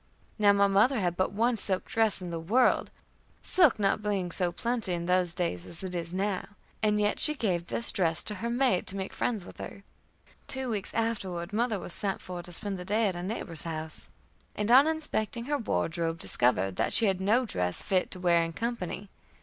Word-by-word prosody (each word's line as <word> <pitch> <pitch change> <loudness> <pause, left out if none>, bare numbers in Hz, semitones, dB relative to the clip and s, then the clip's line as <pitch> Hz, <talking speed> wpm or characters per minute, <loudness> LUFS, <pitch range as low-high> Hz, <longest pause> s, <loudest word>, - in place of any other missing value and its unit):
Now 205 -1 +5
my 200 0 +3
mother 215 +6 +3
had 175 -3 -1
but 185 - 0
one 230 +4 +1
silk 190 -2 +5
dress 220 -4 +2
in 175 - -6
the 165 - -4
world, 220 +11 +2 0.5
silk 345 -11 +4
not 200 0 +1
being 200 -4 -2
so 180 0 0
plenty 230 -3 -2
in 170 -1 -3
those 180 -1 +1
days 130 - -2
as 170 - -9
it 185 -1 -5
is 170 0 -4
now, 195 -1 -2 0.3
and 210 -1 +2
yet 205 0 0
she 300 - +7
gave 180 - -2
this 235 - +2
dress 165 -3 0
to 210 - -1
her 235 - -2
maid 240 -6 +1
to 195 - +2
make 190 -1 -5
friends 215 -7 -2
with - - -13
her. 200 - -9 0.6
Two 265 -2 -4
weeks 205 -3 -2
afterward 195 -5 -3
mother 225 0 0
was 175 - -5
sent 195 -2 -1
for 180 -1 -7
to 175 - -10
spend 195 +2 -2
the - - -6
day 210 +2 +1
at 185 - -5
a 175 - -5
neighbor's 180 -4 -4
house, 160 -1 -6 0.5
and 210 +2 -1
on 270 +4 +7
inspecting 240 -8 -1
her 290 +1 -1
wardrobe, 165 -6 -2
discovered 95 - +1
that - - 0
she 230 - +5
had 190 -2 0
no 225 +6 +2
dress 90 - -2
fit 185 -3 0
to 185 - -5
wear 175 -2 +3
in 165 0 -3
company. 205 -3 -4
195 Hz, 210 wpm, -28 LUFS, 175-225 Hz, 0.6 s, she